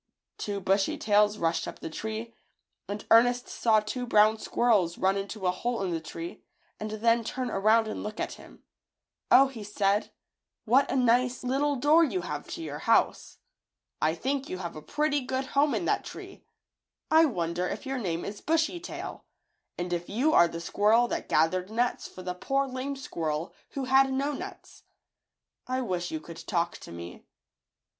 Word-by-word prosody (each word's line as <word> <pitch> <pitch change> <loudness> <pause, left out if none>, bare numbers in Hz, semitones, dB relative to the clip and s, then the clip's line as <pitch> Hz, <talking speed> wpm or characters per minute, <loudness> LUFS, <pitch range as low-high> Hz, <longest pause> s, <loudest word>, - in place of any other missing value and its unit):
Two 205 -1 -3
bushy 195 +1 +1
tails 210 0 +3
rushed 165 -2 0
up - - -7
the - - -7
tree, 220 +5 -5 0.5
and 205 +1 -5
Ernest 245 +2 +5
saw 220 -2 +3
two 245 +4 -4
brown 215 0 +5
squirrels 205 -10 +2
run 190 +1 +2
into 200 0 -4
a 180 - +4
hole 230 +3 -2
in 185 - -1
the 165 -1 -2
tree 165 +2 -7 0.4
and 215 - -4
then 230 +2 +2
turn 250 +1 -3
around 220 +3 +3
and 215 - -4
look 215 +1 -6
at - - -2
him. - - -15 0.7
"0," 270 +1 +7
he 235 -5 -8
said, 205 0 0 0.5
"what 255 +5 +4
a - - -1
nice 250 0 +2
FLOWER 250 - -4
FAIRIES. 270 +2 +1
little 290 -1 +2
door 300 +5 +5
you 205 - 0
have 150 -4 -5
to - - -6
your 150 -2 -5
house! 230 +7 +1 0.6
I 160 +1 +2
think 270 +8 -2
you 185 - -4
have 170 -2 -6
a 155 - -7
pretty 290 - 0
good 260 +1 -2
home 285 +1 +3
in - - -1
that - - +1
tree. - - -10 0.7
I 320 +1 +7
wonder 175 - -1
if - - -5
your 270 -1 -2
name 175 -6 -2
is 205 +1 -6
Bushy 325 +2 +1
Tail, 350 - -7 0.5
and 175 0 -3
if 175 0 -3
you 265 +10 +1
are 170 - +7
the 165 0 -6
squirrel 215 +7 +3
that - - -3
gathered 180 +4 +2
nuts 240 +3 -1
for 185 - -11
the 180 0 -3
poor, 275 +9 0
lame 265 +1 -4
squirrel 160 - -3 0.2
who 275 - -3
had 265 +1 +4
no 275 +2 0
nuts. 375 +7 -9 0.9
I 255 +1 -1
wish 180 -7 -2
you 155 - -3
could 165 +1 -11
talk 170 -4 0
to - - -12
me." 85 +1 -9
215 Hz, 185 wpm, -28 LUFS, 180-260 Hz, 0.9 s, 0